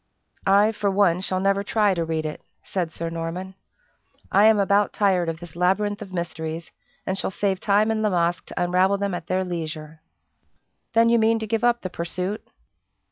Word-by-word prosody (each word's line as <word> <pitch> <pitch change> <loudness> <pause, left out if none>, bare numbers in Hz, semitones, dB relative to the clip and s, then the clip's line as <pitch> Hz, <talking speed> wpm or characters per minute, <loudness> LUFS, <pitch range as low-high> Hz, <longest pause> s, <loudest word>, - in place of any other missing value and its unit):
"I, 200 +3 +5
for 205 -2 -1
one, 190 -3 +2
shall 185 -1 -1
never 195 +1 +2
try 210 -1 +2
to 170 -2 -1
read 160 -1 -2
it," 155 - -5 0.2
said 175 -4 -3
Sir 165 +1 -5
Norman. 170 +3 -5 0.8
"I 200 +2 +5
am 220 -1 +6
about 200 +1 +2
tired 185 -5 +2
of 165 0 -4
this 175 -1 -11
labyrinth 205 +4 +1
of 200 -3 -8
mysteries, 165 -2 -5 0.3
and 190 - -1
shall 195 - -2
save 195 0 -1
time 210 +2 +2
and 220 -1 -1
La 215 - +2
Masque 175 -2 0
to - - -2
unravel 185 +3 +2
them 200 -1 -2
at 175 -1 -5
their 185 +1 0
leisure." 160 -3 -6 0.9
"Then 230 0 +5
you 235 0 +4
mean 225 +1 +3
to 220 - -4
give 225 +1 -1
up 240 0 +3
the 185 - -4
pursuit?" 180 +4 -4
190 Hz, 190 wpm, -24 LUFS, 170-205 Hz, 0.9 s, am